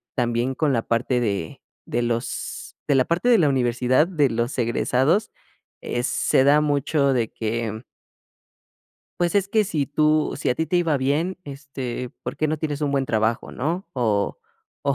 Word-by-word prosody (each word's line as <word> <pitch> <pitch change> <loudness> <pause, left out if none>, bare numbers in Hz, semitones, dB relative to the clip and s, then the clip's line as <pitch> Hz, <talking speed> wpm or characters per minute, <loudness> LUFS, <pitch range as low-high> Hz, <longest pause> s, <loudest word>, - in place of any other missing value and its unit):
también 120 0 0
con 150 -4 +1
la 115 - +1
parte 125 +2 0
de 100 -7 -3 0.3
de 120 - -1
los 120 0 -3 0.3
de 145 - +3
la 130 - +5
parte 175 +9 +1
de 235 -3 +6
la 150 -4 +4
universidad, 125 +2 +2
de 150 -7 +2
los 120 +2 -1
egresados, 130 - +1 0.5
eh, 120 - -2
se 130 - +2
da 150 +2 +5
mucho 145 -1 +1
de 115 -3 0
que 110 0 -3 1.4
Pues, 175 +3 +2
es 195 -1 +2
que 215 +1 +3
si 155 -8 -1
tú 155 +1 +2
si - - -2
a 125 - 0
ti 160 - -1
te 180 - +1
iba 165 -4 +2
bien, 150 +8 0
este, 135 -3 -6
¿por - - -4
qué 155 - 0
no 155 -1 -1
tienes 150 -2 -3
un 145 - 0
buen 135 -2 0
trabajo, 110 +1 0
no? 170 +8 -2
O 110 - 0 0.5
o, 140 - +3
135 Hz, 175 wpm, -23 LUFS, 120-155 Hz, 1.4 s, de